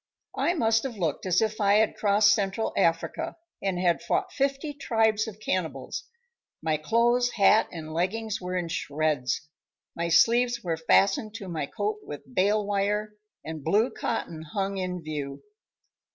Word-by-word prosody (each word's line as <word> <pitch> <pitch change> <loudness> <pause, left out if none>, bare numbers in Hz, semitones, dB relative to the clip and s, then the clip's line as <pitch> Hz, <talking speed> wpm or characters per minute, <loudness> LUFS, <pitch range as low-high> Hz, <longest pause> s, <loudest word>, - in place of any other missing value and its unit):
I 350 - +1
must 225 -6 +3
have 245 -4 -5
looked 165 -1 -2
as 185 +4 +3
if 215 0 -2
I 200 0 +4
had 215 0 +3
crossed 205 0 +4
Central 205 +1 -1
Africa 170 - 0 0.3
and 190 -2 -1
had 175 -2 +2
fought 370 -1 -1
fifty 275 +2 -1
tribes 220 -5 +1
of 215 -1 -8
cannibals. 185 -5 -3 0.5
My 155 -1 0
clothes, 235 +8 +2
hat 210 +1 +5
and 155 -2 -7
leggings 210 +5 -1
were 180 0 -4
in 175 -2 -2
shreds, 150 -4 -1 0.5
my 170 0 -2
sleeves 235 +8 +4
were 170 -3 0
fastened 195 +6 +2
to 205 -4 -7
my 160 -5 -3
coat 210 +5 -2
with 140 -3 -10
bale 205 +5 +2
wire, 205 +1 0 0.3
and 155 -2 -6
blue 210 - +2
cotton 170 -8 -3
hung 195 +5 -3
in 180 -2 -3
view. 145 -3 -5
200 Hz, 155 wpm, -27 LUFS, 165-220 Hz, 0.5 s, hat